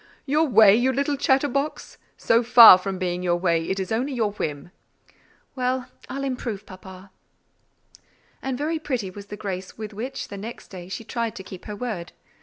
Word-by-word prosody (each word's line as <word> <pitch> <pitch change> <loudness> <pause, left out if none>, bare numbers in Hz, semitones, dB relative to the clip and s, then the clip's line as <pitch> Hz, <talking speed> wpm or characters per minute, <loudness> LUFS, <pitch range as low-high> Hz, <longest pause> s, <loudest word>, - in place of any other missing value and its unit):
"Your 305 +3 +2
way, 220 -6 +7
you 250 +3 +2
little 280 +2 0
chatter 270 +1 +2
box? 280 +3 -4 0.2
So 230 +1 +3
far 235 -5 +9
from 195 0 -4
being 180 -1 -2
your 175 -1 +1
way, 170 -2 0
it 190 - -1
is 190 +1 -4
only 255 +6 -1
your 225 -4 0
whim!" 150 -4 -5 0.8
"Well, 255 0 -2 0.2
I'll 275 +1 -4
improve, 235 -6 -4
papa." 185 0 -13 1.3
And 265 -2 -3
very 315 +3 -2
pretty 245 -11 -3
was 200 +1 -11
the 210 - -8
grace 190 -3 -6
with 215 -1 -7
which, 255 +4 -6
the 200 - -7
next 220 +4 -9
day, 180 -2 -10
she 190 +4 -6
tried 230 0 -3
to 190 - -8
keep 185 -1 -11
her 210 - -6
word. 205 -7 -5
220 Hz, 185 wpm, -24 LUFS, 190-255 Hz, 1.3 s, far